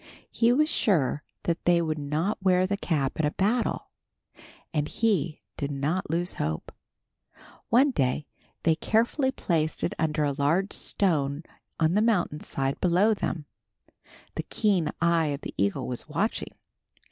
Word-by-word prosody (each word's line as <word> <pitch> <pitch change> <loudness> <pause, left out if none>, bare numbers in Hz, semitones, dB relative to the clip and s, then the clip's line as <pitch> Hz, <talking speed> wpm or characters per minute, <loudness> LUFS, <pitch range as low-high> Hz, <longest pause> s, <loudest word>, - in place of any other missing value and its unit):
He 230 0 +3
was 300 +5 +3
sure 155 - +1 0.2
that 170 0 -1
they 175 -1 +5
would 155 -2 -1
not 155 +9 -1
wear 185 -1 +4
the 200 +2 0
cap 150 -9 -1
in 150 -2 +3
battle, 225 +5 0 0.8
and 150 -2 0
he 185 -8 0
did 140 - -2
not 145 +6 -1
lose 175 +3 0
hope. 75 +1 -3 1.0
One 265 +5 +5
day 135 - 0 0.4
they 165 - +4
carefully 235 - +1
placed 160 -10 -1
it - - 0
under 155 -1 +1
a 145 - +1
large 160 +8 +1
stone 150 -6 0 0.4
on 160 +1 +3
the 210 - +3
mountain 195 -9 +1
side 135 -2 -2
below 185 +5 +4
them. 170 -6 -3 0.9
The - - -2
keen 195 -7 +2
eye 170 -1 +3
of 145 0 -3
the - - -6
eagle 100 0 0
was 125 +4 -3
watching. 195 +9 -2
165 Hz, 145 wpm, -27 LUFS, 150-200 Hz, 1.0 s, they